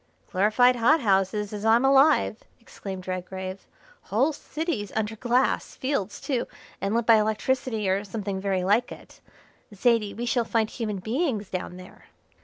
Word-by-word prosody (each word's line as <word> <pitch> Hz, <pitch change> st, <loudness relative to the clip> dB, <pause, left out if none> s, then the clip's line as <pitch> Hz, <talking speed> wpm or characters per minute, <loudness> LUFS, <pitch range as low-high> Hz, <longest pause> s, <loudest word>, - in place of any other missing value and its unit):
"Glorified 215 Hz, +6 st, +4 dB
hot 290 Hz, +7 st, +4 dB
houses, 200 Hz, 0 st, +1 dB
as 205 Hz, 0 st, -5 dB
I'm 225 Hz, +3 st, +4 dB
alive," 275 Hz, -4 st, +4 dB, 0.2 s
exclaimed 190 Hz, -5 st, -8 dB
Redgrave. 185 Hz, +1 st, -5 dB, 0.4 s
"Whole 265 Hz, +10 st, +1 dB
cities 290 Hz, -, -4 dB
under 220 Hz, 0 st, -1 dB
glass, 245 Hz, +3 st, 0 dB
fields, 240 Hz, -7 st, -2 dB
too, 260 Hz, -5 st, -2 dB, 0.3 s
and 200 Hz, +3 st, -1 dB
lit 235 Hz, -1 st, +1 dB
by 225 Hz, -1 st, +7 dB
electricity 220 Hz, +1 st, 0 dB
or 190 Hz, +2 st, +1 dB
something 200 Hz, -2 st, -4 dB
very 190 Hz, -2 st, 0 dB
like 210 Hz, +6 st, +2 dB
it. -, -, -13 dB, 0.5 s
Zaidie, 220 Hz, -1 st, +1 dB
we 240 Hz, -, -4 dB
shall 240 Hz, 0 st, +1 dB
find 225 Hz, -1 st, 0 dB
human 215 Hz, -4 st, -3 dB
beings 220 Hz, -, -2 dB
down 180 Hz, -1 st, -4 dB
there." 185 Hz, 0 st, -14 dB
215 Hz, 150 wpm, -26 LUFS, 195-245 Hz, 0.5 s, by